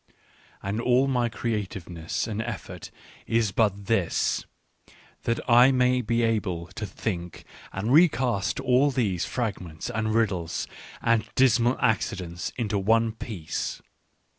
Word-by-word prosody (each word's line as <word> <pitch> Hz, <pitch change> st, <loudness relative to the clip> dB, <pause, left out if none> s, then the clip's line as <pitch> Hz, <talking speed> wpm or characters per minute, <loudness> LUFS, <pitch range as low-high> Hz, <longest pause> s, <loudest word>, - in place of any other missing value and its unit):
" -, -, -29 dB
And 105 Hz, +4 st, -1 dB
all 125 Hz, +2 st, +3 dB
my 125 Hz, -3 st, +1 dB
creativenes 95 Hz, -8 st, -4 dB
s -, -, -1 dB
and 110 Hz, 0 st, -2 dB
effort 115 Hz, -3 st, -6 dB, 0.4 s
is 115 Hz, -3 st, +2 dB
but 100 Hz, -2 st, +1 dB
this, 100 Hz, -6 st, 0 dB, 0.8 s
that 115 Hz, 0 st, +1 dB
I 120 Hz, +2 st, +7 dB
may 125 Hz, -1 st, +3 dB
be 115 Hz, 0 st, 0 dB
able 105 Hz, -7 st, 0 dB
to 105 Hz, +1 st, -4 dB
think 90 Hz, -4 st, -5 dB, 0.3 s
and 105 Hz, +6 st, -1 dB
recast 130 Hz, -, +3 dB
all 130 Hz, +1 st, +3 dB
these 105 Hz, -10 st, 0 dB
fragments 100 Hz, -7 st, -4 dB
and 110 Hz, -1 st, -1 dB
riddles 95 Hz, -7 st, 0 dB, 0.4 s
and 115 Hz, -2 st, +2 dB
dismal 120 Hz, -1 st, +4 dB
accidents 95 Hz, -4 st, -1 dB
into 105 Hz, -4 st, 0 dB
one 115 Hz, +3 st, +3 dB
piece. 100 Hz, -8 st, -5 dB
110 Hz, 130 wpm, -26 LUFS, 95-120 Hz, 0.8 s, I